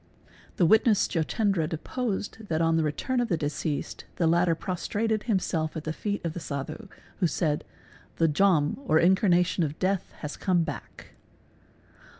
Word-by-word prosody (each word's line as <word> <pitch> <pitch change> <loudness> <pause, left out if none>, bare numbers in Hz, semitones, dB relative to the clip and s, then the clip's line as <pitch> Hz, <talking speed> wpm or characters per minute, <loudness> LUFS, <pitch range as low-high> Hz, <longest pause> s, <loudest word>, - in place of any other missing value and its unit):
The 175 - +3
witness 220 +3 +4
Jotendra 180 0 0
deposed 210 +4 -4
that 160 -3 0
on 165 0 +3
the 165 - +3
return 160 - -1
of 240 - +1
the 170 - 0
deceased 150 0 -3
the 170 - +1
latter 170 +1 +3
prostrated 210 +5 -2
himself 165 -6 0
at 155 - -5
the 155 - -3
feet 205 +1 -3
of 165 - -2
the 175 - -5
Sadhu, 145 +9 -5 0.3
who 180 - +3
said 150 -1 -1 0.5
"The 165 - +3
Jom 155 - +2
or 155 - +4
incarnation 180 0 +3
of 150 -1 -3
death 190 0 -1
has 150 -1 -5
come 180 -3 +2
back. - - -8
170 Hz, 155 wpm, -27 LUFS, 155-200 Hz, 0.5 s, witness